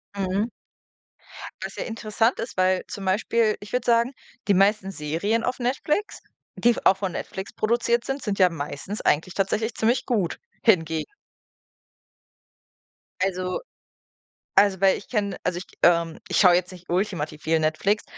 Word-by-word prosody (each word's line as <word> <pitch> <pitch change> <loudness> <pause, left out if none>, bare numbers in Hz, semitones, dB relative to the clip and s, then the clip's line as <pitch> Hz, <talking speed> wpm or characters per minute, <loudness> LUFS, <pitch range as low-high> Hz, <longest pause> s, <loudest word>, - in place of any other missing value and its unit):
Mhm. 195 +2 0 1.2
Was - - -6
ja - - -2
interessant 225 +1 0
ist, 230 -3 -5
weil 185 0 +2
zum 195 -1 -7
Beispiel 215 +3 +2
ich 205 - -10
würde 250 - 0
sagen, 235 +2 +3 0.4
die 200 - +5
meisten 195 +1 +3
Serien 190 +8 -1
auf 250 - -1
Netflix, 300 - -1 0.4
die 240 0 +3
v - - -6
auch 190 - +5
von 190 -3 -2
Netflix 190 +1 -6
produziert 235 +1 +1
sind, 270 +1 -3
sind 200 -3 -2
ja 185 -1 +6
meistens 150 +5 -5
eigentlich 160 +5 +1
tatsächlich 220 +4 0
ziemlich 240 +3 +1
gut 205 -9 -1 0.2
hingegen. 160 -7 +3 2.2
Also 185 -1 -1 1.0
also, 200 -2 +5
weil 190 -1 +5
ich - - -14
kenne, 205 -4 -1
also, 180 -1 -1
ich, 180 - -7 0.2
ähm 170 -2 +3
ich 180 - -1
schaue 180 -3 +7
jetzt 180 +1 0
nicht 180 -1 -12
ultimativ 175 -6 -2
viel 160 0 +3
Netflix, 175 +7 +1
195 Hz, 150 wpm, -24 LUFS, 180-225 Hz, 2.2 s, schaue